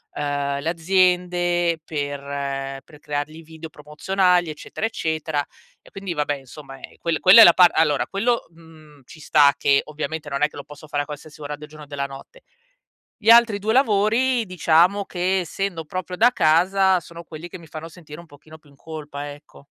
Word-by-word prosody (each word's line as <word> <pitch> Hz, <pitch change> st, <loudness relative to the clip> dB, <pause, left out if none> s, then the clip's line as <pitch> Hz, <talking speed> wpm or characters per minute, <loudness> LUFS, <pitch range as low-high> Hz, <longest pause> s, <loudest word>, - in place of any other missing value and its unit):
uhm, 140 Hz, -1 st, -2 dB
le 145 Hz, -, -6 dB
aziende 175 Hz, -1 st, +1 dB
per 145 Hz, -2 st, -4 dB, 0.6 s
per 150 Hz, -, -17 dB
creargli 150 Hz, +2 st, -5 dB
video 160 Hz, 0 st, -11 dB
promozionali 175 Hz, +4 st, 0 dB
eccetera, 155 Hz, +7 st, -6 dB
eccetera; 160 Hz, -8 st, -2 dB, 0.4 s
e -, -, -19 dB
quindi 195 Hz, -2 st, -6 dB
vabbè 145 Hz, -2 st, -1 dB
insomma, 135 Hz, +1 st, -12 dB
ehm, -, -, -12 dB
quel 165 Hz, -2 st, -2 dB
quella 190 Hz, +5 st, +8 dB
è -, -, +12 dB
la 175 Hz, -, +8 dB
par 180 Hz, -1 st, +6 dB
allora 150 Hz, -3 st, +2 dB
quello, 235 Hz, +5 st, -1 dB
mhmm, 160 Hz, -3 st, -18 dB
ci 155 Hz, -, -15 dB
sta 145 Hz, -2 st, +4 dB
che 140 Hz, -1 st, +3 dB
ovviamente 155 Hz, 0 st, -5 dB
non 140 Hz, 0 st, -3 dB
è 150 Hz, -, +4 dB
che -, -, -18 dB
lo 140 Hz, -, -7 dB
posso 150 Hz, +1 st, -14 dB
fare 145 Hz, -1 st, -2 dB
a -, -, -11 dB
qualsiasi 150 Hz, +1 st, -11 dB
ora 145 Hz, 0 st, -5 dB
del 150 Hz, +1 st, -12 dB
giorno 155 Hz, 0 st, -13 dB
e -, -, -24 dB
della 140 Hz, -1 st, -4 dB
notte. 140 Hz, -, -13 dB, 0.8 s
Gli 215 Hz, -, -1 dB
altri 230 Hz, -3 st, +6 dB
2 215 Hz, +2 st, -1 dB
lavori 235 Hz, +1 st, +2 dB
diciamo 180 Hz, +2 st, +2 dB
che, 185 Hz, +1 st, -1 dB
essendo 180 Hz, 0 st, -4 dB
proprio 185 Hz, +3 st, -5 dB
da 240 Hz, +5 st, +5 dB
casa, 185 Hz, +2 st, +3 dB
sono 170 Hz, +1 st, -12 dB
quelli 165 Hz, 0 st, -10 dB
che 185 Hz, -, -9 dB
mi 165 Hz, -, -15 dB
fanno 155 Hz, +1 st, -9 dB
sentire 160 Hz, -3 st, -12 dB
un 170 Hz, -, -12 dB
pochino 155 Hz, +2 st, -16 dB
più 150 Hz, -2 st, -24 dB
in 140 Hz, -, -21 dB
colpa 145 Hz, -2 st, -8 dB
ecco. 145 Hz, -1 st, -18 dB
160 Hz, 190 wpm, -22 LUFS, 150-185 Hz, 0.8 s, è